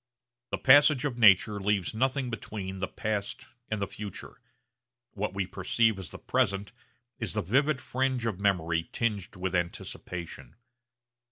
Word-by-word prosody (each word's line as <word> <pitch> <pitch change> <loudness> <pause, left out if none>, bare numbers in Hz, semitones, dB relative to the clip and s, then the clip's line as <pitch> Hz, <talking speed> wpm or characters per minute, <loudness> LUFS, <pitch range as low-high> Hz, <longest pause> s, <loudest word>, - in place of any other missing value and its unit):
The - - -1
passage 145 0 +6
of 125 -4 -2
nature 105 -1 +6
leaves 100 -1 0
nothing 130 +2 0
between 95 -4 -5
the 95 - -1
past 105 -1 -3 0.2
and 110 - -2
the 100 - 0
future. 105 -2 -8 0.7
What 105 -1 -3
we 95 -1 0
perceive 100 +3 +1
as 90 -5 -7 0.2
present 105 -6 0 0.5
is 110 -8 -2
the - - -1
vivid 135 - +2
fringe 130 -2 -1
of 105 -5 -2
memory 85 -4 +1
tinged 105 -4 -2
with 95 0 -3
anticipation. 85 -1 -4
105 Hz, 140 wpm, -29 LUFS, 95-120 Hz, 0.7 s, passage